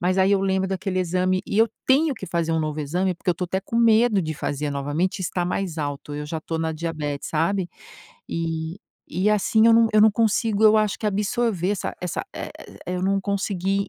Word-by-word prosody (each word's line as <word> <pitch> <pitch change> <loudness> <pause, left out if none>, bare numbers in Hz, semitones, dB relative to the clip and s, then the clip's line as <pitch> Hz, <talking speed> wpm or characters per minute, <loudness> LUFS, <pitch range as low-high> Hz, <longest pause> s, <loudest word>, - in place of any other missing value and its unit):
Mas 185 +1 +1
aí 190 +1 +4
eu 200 - +3
lembro 190 0 +1
daquele 190 0 -2
exame 185 +1 0
e 200 - -1
eu 225 +1 +5 0.2
tenho 285 +3 +3
que 200 -5 -8
fazer 170 -1 -1
um 160 - +1
novo 155 0 -2
exame, 180 +6 -1
porque 175 - -9
eu - - +4
estou 180 +2 -4
até 190 +2 -2
com 215 +4 -5
medo 230 -3 +4
de 155 -1 -3
fazer 145 0 -3
novamente, 145 +7 -1
estar 180 -1 -1
mais 180 -1 -2
alto, 145 0 -4
eu 150 0 -4
já 160 +2 -3
estou 160 +1 -4
na 160 0 -1
diabete, 155 -3 -4
sabe, 175 +4 0 0.6
e 165 +1 -3 0.4
e 185 +4 +2
assim 215 +2 +3
eu 230 - +7
não 230 0 +5
eu 215 - +5
não 215 +1 +7
consigo, 220 -1 +1
eu 215 0 +7
acho 215 -2 +1
que 215 - -3
absorver 205 -2 0
essa 205 - -4
essa 180 -2 -3
e 180 - -8
e - - -1
eu 180 - -3
não 195 +1 +1
consegui 195 0 -1
185 Hz, 220 wpm, -23 LUFS, 165-205 Hz, 0.6 s, eu